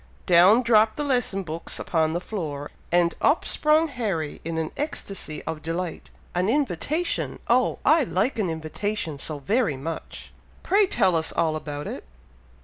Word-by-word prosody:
Down 185 Hz, +8 st, +6 dB
dropped 220 Hz, -2 st, +4 dB
the 295 Hz, -, -2 dB
lesson 245 Hz, -8 st, 0 dB
books 165 Hz, 0 st, -4 dB
upon 160 Hz, -2 st, 0 dB
the 170 Hz, -, 0 dB
floor, 155 Hz, -8 st, -5 dB, 0.2 s
and 175 Hz, 0 st, +3 dB
up 290 Hz, -, +3 dB
sprung 310 Hz, +2 st, +3 dB
Harry 205 Hz, -, -3 dB
in 165 Hz, 0 st, -3 dB
an 160 Hz, -1 st, -2 dB
ecstacy 205 Hz, -, -5 dB
of 160 Hz, -1 st, -5 dB
delight. 165 Hz, +2 st, -4 dB, 0.2 s
"An 180 Hz, +3 st, +1 dB
invitation! 290 Hz, -, -1 dB
Oh! 250 Hz, +2 st, +3 dB
I 310 Hz, +2 st, +5 dB
like 190 Hz, +9 st, 0 dB
an 195 Hz, -5 st, +1 dB
invitation 160 Hz, 0 st, -3 dB
so 150 Hz, +1 st, -4 dB
very 175 Hz, -, 0 dB
much! 160 Hz, +4 st, -7 dB, 0.3 s
Pray 400 Hz, +1 st, +4 dB
tell 190 Hz, -, +2 dB
us 160 Hz, -1 st, 0 dB
all 160 Hz, -2 st, +1 dB
about 145 Hz, -1 st, -5 dB
it!" -, -, -6 dB
180 Hz, 155 wpm, -25 LUFS, 160-245 Hz, 0.3 s, Down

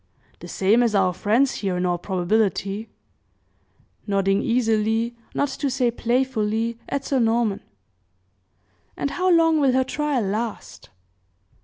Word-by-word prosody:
"The -, -, -10 dB
same 205 Hz, +5 st, +2 dB
as 230 Hz, -3 st, +1 dB
our 185 Hz, -2 st, +2 dB
friend's 230 Hz, +9 st, +2 dB
here, 190 Hz, -3 st, -1 dB
in 180 Hz, -, -1 dB
all 175 Hz, -1 st, 0 dB
probability," 195 Hz, +3 st, -1 dB, 1.2 s
nodding 195 Hz, -1 st, +1 dB
easily, 225 Hz, 0 st, 0 dB, 0.2 s
not 285 Hz, -, +1 dB
to 275 Hz, +1 st, -2 dB
say 250 Hz, -2 st, +1 dB
playfully, 230 Hz, -2 st, -1 dB
at 275 Hz, -1 st, -3 dB
Sir 270 Hz, -, 0 dB
Norman. 225 Hz, -3 st, +1 dB, 1.4 s
"And 280 Hz, -, -2 dB
how 370 Hz, +1 st, 0 dB
long 325 Hz, -2 st, +4 dB
will 270 Hz, -3 st, +3 dB
her 260 Hz, 0 st, +3 dB
trial 290 Hz, -3 st, -1 dB
last?" 215 Hz, +3 st, -5 dB
230 Hz, 130 wpm, -23 LUFS, 200-260 Hz, 1.4 s, long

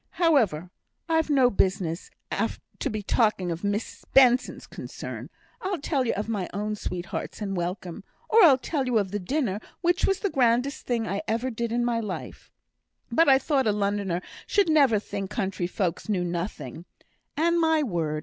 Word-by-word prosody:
However, 220 Hz, -, +2 dB, 0.4 s
I've 320 Hz, -1 st, +1 dB
no 265 Hz, -4 st, +4 dB
business 185 Hz, -3 st, 0 dB, 0.2 s
to -, -, -3 dB
be 215 Hz, -1 st, -4 dB
talking 205 Hz, -5 st, +1 dB
of 165 Hz, +3 st, -5 dB
Miss 205 Hz, +2 st, -3 dB
Benson's 255 Hz, -2 st, +5 dB
concerns. -, -, -7 dB, 0.3 s
I'll 380 Hz, 0 st, -1 dB
tell 275 Hz, -3 st, 0 dB
you -, -, +1 dB
of 205 Hz, -, -3 dB
my 205 Hz, -5 st, -2 dB
own 210 Hz, +2 st, -2 dB
sweethearts 180 Hz, -3 st, -5 dB
and 200 Hz, -2 st, -3 dB
welcome, 180 Hz, 0 st, -4 dB, 0.2 s
or 450 Hz, 0 st, +5 dB
I'll 285 Hz, -7 st, +8 dB
tell 270 Hz, 0 st, -2 dB
you 245 Hz, -2 st, +2 dB
of 200 Hz, -3 st, 0 dB
the 205 Hz, -, -2 dB
dinner, 210 Hz, 0 st, -1 dB, 0.2 s
which 350 Hz, +1 st, +2 dB
was 390 Hz, -1 st, 0 dB
the 400 Hz, -, 0 dB
grandest 250 Hz, +2 st, +1 dB
thing 230 Hz, -3 st, 0 dB
I 200 Hz, +1 st, -2 dB
ever 235 Hz, +4 st, -1 dB
did 235 Hz, 0 st, -3 dB
in 240 Hz, 0 st, +1 dB
my 235 Hz, -1 st, +1 dB
life, 210 Hz, -5 st, -6 dB, 0.6 s
but 325 Hz, +5 st, +4 dB
I 265 Hz, -, +7 dB
thought 270 Hz, -2 st, +1 dB
a -, -, +4 dB
Lunnoner 200 Hz, -3 st, -1 dB, 0.2 s
should 400 Hz, -5 st, +3 dB
never 280 Hz, -8 st, +5 dB
think 200 Hz, -1 st, -4 dB
country 190 Hz, -5 st, -2 dB
folks 180 Hz, +1 st, -2 dB
knew 190 Hz, -4 st, +1 dB
nothing; 170 Hz, -, -4 dB, 0.5 s
and, 340 Hz, +2 st, +3 dB
my 320 Hz, -1 st, +3 dB
word! 165 Hz, -, -1 dB
220 Hz, 175 wpm, -26 LUFS, 190-275 Hz, 0.6 s, I'll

